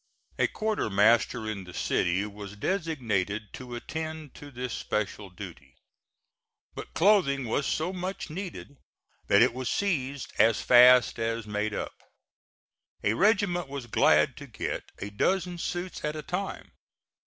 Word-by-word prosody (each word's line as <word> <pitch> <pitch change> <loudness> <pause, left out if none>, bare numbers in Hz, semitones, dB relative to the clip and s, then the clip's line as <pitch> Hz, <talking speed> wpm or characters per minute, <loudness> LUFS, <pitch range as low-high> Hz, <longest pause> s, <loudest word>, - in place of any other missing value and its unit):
A - - +4
quartermaster 115 - +2
in 105 -3 -4
the 90 -1 -11
city 90 +3 +1
was 105 -1 -8
designated 110 - -2
to 125 -2 -7
attend 160 +3 -6
to 145 - -11
this 125 -2 -5
special 105 -1 -3
duty; 85 -9 -11 1.0
but - - -9
clothing 170 -9 +4
was 130 +5 0
so 165 +4 -1
much 185 +1 -4
needed 175 -5 -7 0.5
that 100 +3 +6
it 125 -1 +3
was 130 0 -3
seized 140 -9 -1
as 110 0 +5
fast 125 0 +6
as 115 -1 -1
made 105 0 -2
up. - - -4 1.1
A 100 - +2
regiment 190 - +2
was 135 -2 -6
glad 120 - +3
to - - -9
get - - -4
a 100 - -6
dozen 180 - 0
suits 175 +2 -4
at 150 0 -2
a 155 - -5
time. 185 +5 -4
125 Hz, 140 wpm, -28 LUFS, 105-170 Hz, 1.1 s, that